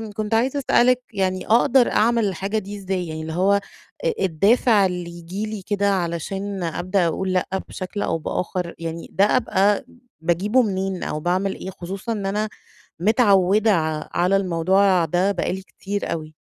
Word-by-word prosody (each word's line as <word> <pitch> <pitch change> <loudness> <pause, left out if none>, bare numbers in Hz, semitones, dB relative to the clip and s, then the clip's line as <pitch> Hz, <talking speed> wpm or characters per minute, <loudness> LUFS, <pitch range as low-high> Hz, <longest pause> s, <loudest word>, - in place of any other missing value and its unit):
كنت 215 +1 -2
عايزة 255 +5 +2
أسألِك 250 -1 +3
يعني، 185 -2 -1
أقدر 240 +2 +4
أعمل 230 +1 +3
الحاجة 195 +3 -2
دي 205 -1 -5
إزاي؟ 190 -2 -3
يعني 160 0 -5
اللي 160 0 -5
هو 190 +4 +3 0.5
أ - - +3
الدافع 200 +4 +3
اللي 180 -2 -3
يجيلي 200 +5 -5
كده 200 -1 +1
علشان 190 +2 -3
أبدأ 175 +2 0
أقول 185 +3 -2
لأ 180 - +1 0.2
بشكل 195 +2 -5
أو - - 0
بآخر، 175 +2 -3
يعني 165 0 -6
ده 195 - +4
أبقى 205 -3 +2 0.4
باجيبه 185 +9 +2
منين، 190 -3 -2
أو 150 - -3
باعمل 185 +4 0
إيه؟ - - -7
خصوصًا 190 +5 -6
إن 210 -3 -3
أنا 210 +2 -1 0.5
متعودة 205 0 +4
ع 155 -3 -1
على 180 +3 +2
الموضوع 185 0 +2
ده 180 +5 +1
بقى 180 - -1
لي 190 - -5
كتير 200 +1 -5
أوي. 155 -1 -7
190 Hz, 160 wpm, -22 LUFS, 175-210 Hz, 0.5 s, أقدر